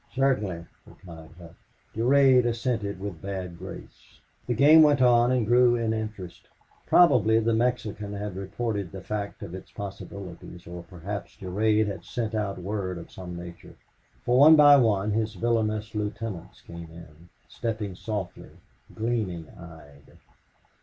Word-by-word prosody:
"Certainly," 105 Hz, -11 st, 0 dB, 0.2 s
replied 80 Hz, -3 st, -13 dB
Hough. 85 Hz, -2 st, -13 dB, 0.4 s
Durade 130 Hz, +2 st, +4 dB
assented 115 Hz, -4 st, -2 dB
with 95 Hz, -5 st, -7 dB
bad 95 Hz, -3 st, -6 dB
grace. 95 Hz, +2 st, -12 dB, 0.3 s
The 120 Hz, -, 0 dB
game 150 Hz, +6 st, +7 dB
went 145 Hz, -3 st, +5 dB
on 120 Hz, -1 st, +4 dB
and 125 Hz, -3 st, +1 dB
grew 120 Hz, +1 st, +4 dB
in 115 Hz, -2 st, -1 dB
interest. 105 Hz, -5 st, -6 dB, 0.4 s
Probably 115 Hz, -10 st, +5 dB
the 115 Hz, 0 st, +1 dB
Mexican 110 Hz, -3 st, -1 dB
had 100 Hz, -1 st, -5 dB
reported 100 Hz, 0 st, -4 dB
the 95 Hz, -1 st, -9 dB
fact 105 Hz, -1 st, -5 dB
of 95 Hz, -3 st, -8 dB
its 95 Hz, -, -9 dB
possibilities, 95 Hz, -3 st, -9 dB
or 85 Hz, 0 st, -8 dB
perhaps 95 Hz, +5 st, -8 dB
Durade 105 Hz, +3 st, +1 dB
had 100 Hz, -2 st, -5 dB
sent 115 Hz, -2 st, -4 dB
out 105 Hz, -3 st, -2 dB
word 95 Hz, -1 st, -4 dB
of 85 Hz, -, -11 dB
some 90 Hz, -2 st, -8 dB
nature. 85 Hz, 0 st, -10 dB, 0.5 s
For 125 Hz, +1 st, +3 dB
one 155 Hz, +3 st, +9 dB
by 145 Hz, -1 st, +8 dB
one 105 Hz, -5 st, +2 dB
his 110 Hz, 0 st, -1 dB
villainous 110 Hz, 0 st, -1 dB
lieutenants 105 Hz, -4 st, -5 dB
came 85 Hz, -1 st, -10 dB
in, 85 Hz, 0 st, -15 dB, 0.2 s
stepping 110 Hz, -4 st, -4 dB
softly, 100 Hz, -1 st, -6 dB, 0.5 s
gleaming 110 Hz, -8 st, -3 dB
eyed. 75 Hz, -4 st, -15 dB
105 Hz, 140 wpm, -26 LUFS, 90-115 Hz, 0.5 s, one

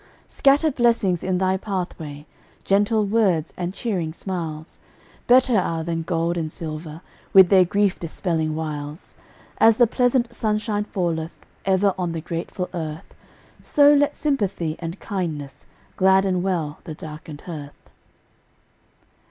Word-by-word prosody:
Scatter 285 Hz, +3 st, +3 dB
blessings 230 Hz, -8 st, +2 dB
in 185 Hz, -1 st, 0 dB
thy 190 Hz, +1 st, +1 dB
pathway! 175 Hz, -7 st, -5 dB, 0.4 s
Gentle 205 Hz, +2 st, +2 dB
words 195 Hz, -7 st, +1 dB
and 175 Hz, 0 st, -3 dB
cheering 185 Hz, -7 st, -3 dB
smiles 165 Hz, -4 st, -6 dB, 0.5 s
Better 255 Hz, 0 st, +5 dB
are 165 Hz, -3 st, -2 dB
than 165 Hz, 0 st, -2 dB
gold 170 Hz, 0 st, -1 dB
and 160 Hz, -2 st, -3 dB
silver, 155 Hz, 0 st, -7 dB, 0.3 s
With 190 Hz, -3 st, +8 dB
their 190 Hz, -2 st, +6 dB
grief 200 Hz, +1 st, +1 dB
dispelling 160 Hz, -2 st, -2 dB
wiles. 150 Hz, 0 st, -6 dB, 0.5 s
As 225 Hz, -1 st, +6 dB
the 240 Hz, -, +6 dB
pleasant 245 Hz, 0 st, +1 dB
sunshine 210 Hz, -2 st, -1 dB
falleth 170 Hz, -5 st, -2 dB, 0.3 s
Ever 195 Hz, 0 st, +3 dB
on 175 Hz, -2 st, -1 dB
the 165 Hz, -, -4 dB
grateful 170 Hz, +2 st, -4 dB
earth, 160 Hz, -2 st, -6 dB, 0.5 s
So 290 Hz, 0 st, +5 dB
let 290 Hz, 0 st, +2 dB
sympathy 200 Hz, -, -1 dB
and 170 Hz, +2 st, -6 dB
kindness 160 Hz, -9 st, -5 dB, 0.3 s
Gladden 190 Hz, -1 st, +3 dB
well 170 Hz, -5 st, -2 dB
the 155 Hz, -, -6 dB
darkened 155 Hz, -1 st, -9 dB
hearth. 150 Hz, -5 st, -10 dB
180 Hz, 125 wpm, -23 LUFS, 160-205 Hz, 0.5 s, With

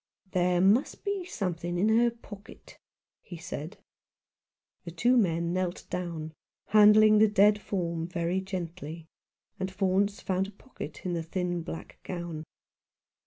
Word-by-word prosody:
"There 180 Hz, -1 st, +2 dB
may 205 Hz, +8 st, +5 dB, 0.2 s
be 400 Hz, -3 st, -2 dB
something 175 Hz, -, -3 dB
in 205 Hz, +5 st, +2 dB
her 235 Hz, +2 st, +4 dB
pocket," 220 Hz, -3 st, -13 dB, 0.4 s
he 175 Hz, -, -9 dB
said. 165 Hz, +2 st, -7 dB, 1.1 s
The -, -, -7 dB
two 240 Hz, +10 st, +2 dB
men 170 Hz, -6 st, +1 dB
knelt 185 Hz, -1 st, -2 dB
down, 165 Hz, -3 st, -4 dB, 0.4 s
handling 215 Hz, 0 st, +7 dB
the 220 Hz, -, +7 dB
dead 210 Hz, 0 st, +4 dB
form 170 Hz, -5 st, -2 dB
very 175 Hz, +1 st, -1 dB
gently, 170 Hz, -4 st, -6 dB, 0.5 s
and 190 Hz, 0 st, -2 dB
Faunce 195 Hz, +1 st, +1 dB
found 190 Hz, 0 st, -1 dB
a -, -, -10 dB
pocket 190 Hz, -, -10 dB
in 180 Hz, -, -1 dB
the 170 Hz, -, -1 dB
thin 175 Hz, +1 st, -2 dB
black 165 Hz, 0 st, -8 dB
gown. 170 Hz, -3 st, -6 dB
185 Hz, 135 wpm, -29 LUFS, 170-205 Hz, 1.1 s, handling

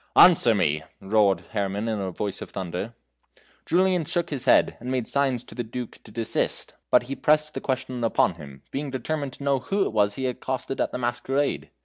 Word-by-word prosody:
"Answer -, -, +7 dB
me," 75 Hz, +1 st, +1 dB, 0.2 s
roared 100 Hz, -3 st, +3 dB
Herrman 100 Hz, 0 st, -1 dB
in 110 Hz, -2 st, -1 dB
a 95 Hz, -1 st, -2 dB
voice 100 Hz, +2 st, -4 dB
of -, -, -7 dB
thunder. 95 Hz, +5 st, -5 dB, 0.7 s
Julian 180 Hz, 0 st, +3 dB
shook 175 Hz, +2 st, -2 dB
his 140 Hz, -4 st, -2 dB
head, -, -, +5 dB
and 125 Hz, -, -6 dB
made 130 Hz, -3 st, 0 dB
signs 135 Hz, -4 st, +1 dB
to -, -, -13 dB
the 120 Hz, -, -3 dB
Duke 120 Hz, +1 st, -7 dB
to 110 Hz, -, -13 dB
desist, 115 Hz, +1 st, -1 dB, 0.2 s
but -, -, +5 dB
he 135 Hz, +3 st, -5 dB
pressed 150 Hz, +1 st, +2 dB
the -, -, -4 dB
question 130 Hz, -1 st, -2 dB
he 120 Hz, -, 0 dB
upon 95 Hz, -, +2 dB
him, 70 Hz, -4 st, -12 dB
being 140 Hz, +1 st, -3 dB
determined 135 Hz, +1 st, -3 dB
to 140 Hz, -, -9 dB
know 140 Hz, -1 st, +2 dB
who 195 Hz, +10 st, 0 dB
it 105 Hz, -2 st, +2 dB
he 130 Hz, -, -5 dB
had 125 Hz, -1 st, -1 dB
accosted 130 Hz, +1 st, -3 dB
at -, -, 0 dB
the -, -, -3 dB
masquerade. 130 Hz, +3 st, -1 dB
125 Hz, 210 wpm, -25 LUFS, 105-140 Hz, 0.7 s, Answer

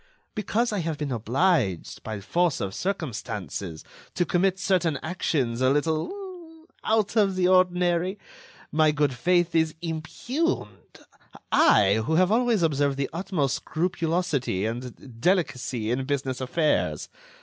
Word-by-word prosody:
Because 220 Hz, +2 st, 0 dB
I 205 Hz, -, 0 dB
have 165 Hz, -3 st, -2 dB
been 145 Hz, -2 st, -3 dB
obliged, 120 Hz, -, 0 dB
by 110 Hz, -2 st, -5 dB
force 175 Hz, -, +1 dB
of 95 Hz, -1 st, -3 dB
circumstances, 105 Hz, -, -4 dB, 0.3 s
to 175 Hz, -, +1 dB
commit 185 Hz, +2 st, +1 dB
certain 180 Hz, -6 st, +1 dB
actions 140 Hz, -8 st, -1 dB
a 130 Hz, -, +4 dB
little... 325 Hz, -, -3 dB, 0.2 s
out 220 Hz, -1 st, +1 dB
of 200 Hz, -4 st, +3 dB
the 185 Hz, -1 st, +2 dB
ordinary, 180 Hz, 0 st, +2 dB, 0.5 s
my 155 Hz, 0 st, +4 dB
good 145 Hz, -2 st, +1 dB
faith 175 Hz, +6 st, +1 dB
is 160 Hz, -1 st, +2 dB
impugned... 170 Hz, -, -3 dB, 0.5 s
I, 105 Hz, +1 st, +5 dB
who 160 Hz, +8 st, 0 dB
have 185 Hz, +3 st, +4 dB
always 230 Hz, -4 st, +2 dB
observed 145 Hz, -3 st, +1 dB
the 140 Hz, -, -2 dB
utmost 170 Hz, -6 st, -1 dB
scrupulosity 165 Hz, -, -1 dB
and 120 Hz, +1 st, -7 dB
delicacy 130 Hz, -, 0 dB
in 130 Hz, +2 st, -1 dB
business 135 Hz, -2 st, -2 dB
affairs. 150 Hz, +4 st, 0 dB
160 Hz, 125 wpm, -26 LUFS, 130-185 Hz, 0.5 s, I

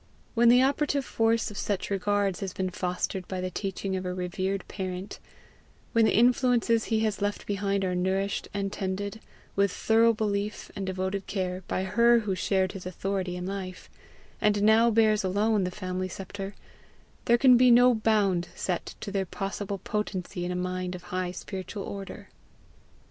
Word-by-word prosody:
When 235 Hz, 0 st, +5 dB
the 250 Hz, +2 st, +6 dB
operative 280 Hz, 0 st, +1 dB
force 225 Hz, -1 st, +1 dB
of 205 Hz, -, -7 dB
such 200 Hz, -1 st, -2 dB
regards 200 Hz, -1 st, 0 dB
has 190 Hz, -2 st, -4 dB
been 185 Hz, -1 st, -2 dB
fostered 180 Hz, 0 st, -3 dB
by 185 Hz, -, -4 dB
the 185 Hz, 0 st, -3 dB
teaching 195 Hz, 0 st, -3 dB
of 185 Hz, -, -3 dB
a 180 Hz, 0 st, -3 dB
revered 190 Hz, +2 st, -2 dB
parent; 185 Hz, 0 st, -5 dB, 0.7 s
when 230 Hz, -1 st, +4 dB
the -, -, +3 dB
influences 240 Hz, -1 st, +3 dB
he 220 Hz, -1 st, +1 dB
has 215 Hz, -3 st, -1 dB
left 205 Hz, 0 st, -2 dB
behind 200 Hz, -1 st, 0 dB
are 180 Hz, -, -1 dB
nourished 190 Hz, +2 st, -1 dB
and 200 Hz, -1 st, -3 dB
tended, 200 Hz, +3 st, -3 dB, 0.3 s
with 200 Hz, -1 st, +3 dB
thorough 225 Hz, +3 st, +4 dB
belief 210 Hz, -1 st, -2 dB
and 195 Hz, -2 st, -4 dB
devoted 190 Hz, +1 st, -2 dB
care, 185 Hz, -2 st, -2 dB
by 185 Hz, -, -1 dB
her 235 Hz, +4 st, +4 dB
who 205 Hz, -3 st, -1 dB
shared 185 Hz, 0 st, +1 dB
his 185 Hz, -2 st, -7 dB
authority 185 Hz, 0 st, -2 dB
in 180 Hz, 0 st, -5 dB
life, 190 Hz, -1 st, -6 dB, 0.5 s
and 205 Hz, -1 st, +2 dB
now 220 Hz, +2 st, +6 dB
bears 215 Hz, -2 st, +3 dB
alone 205 Hz, +1 st, +1 dB
the -, -, -1 dB
family 185 Hz, 0 st, -3 dB
sceptre, 195 Hz, +2 st, -7 dB, 0.7 s
there 235 Hz, -, +5 dB
can 255 Hz, 0 st, +7 dB
be 250 Hz, +1 st, +6 dB
no 245 Hz, +1 st, +7 dB
bound 205 Hz, -5 st, +2 dB
set 180 Hz, -2 st, -3 dB
to 200 Hz, -, -5 dB
their 195 Hz, -2 st, -1 dB
possible 200 Hz, +1 st, -4 dB
potency 190 Hz, -2 st, -3 dB
in 175 Hz, -, -2 dB
a -, -, -2 dB
mind 180 Hz, 0 st, -2 dB
of 180 Hz, -, -9 dB
high 185 Hz, -1 st, -1 dB
spiritual 190 Hz, +2 st, -6 dB
order. 195 Hz, -1 st, -7 dB
195 Hz, 170 wpm, -28 LUFS, 185-215 Hz, 0.7 s, can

